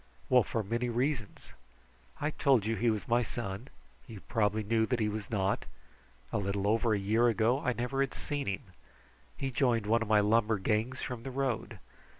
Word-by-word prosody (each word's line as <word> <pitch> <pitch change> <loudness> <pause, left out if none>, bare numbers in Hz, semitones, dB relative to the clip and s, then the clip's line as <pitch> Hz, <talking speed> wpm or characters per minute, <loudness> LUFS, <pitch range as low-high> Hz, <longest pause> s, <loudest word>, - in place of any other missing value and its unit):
Well, 125 -1 +6
for 110 0 -2
many 120 +4 -1
reasons! 120 -2 -2 0.7
I 150 +1 0
told 135 -8 +3
you 115 +1 0
he 120 +1 +2
was 110 -2 -2
my 120 +1 +3
son. 115 -1 -5 0.4
You 105 -4 -9
probably 110 -2 0
knew 110 +1 +1
that 125 -2 0
he 110 - +1
was 105 0 -4
not. 100 -3 0 0.7
A - - +1
little 100 0 -1
over 110 +1 +2
a - - +1
year 110 +5 +2
ago 115 +3 +2
I 125 -3 0
never 125 +3 -1
had 135 - -1
seen 145 -2 -3
him. 100 -1 -2 0.7
He 135 -1 -2
joined 120 -3 +2
one 115 +2 +2
of 110 - -2
my 105 0 +5
lumber 110 +1 +3
gangs 110 +6 -1
from 125 -3 -4
the 135 - -6
road. 130 -3 -2
115 Hz, 190 wpm, -31 LUFS, 105-125 Hz, 0.7 s, Well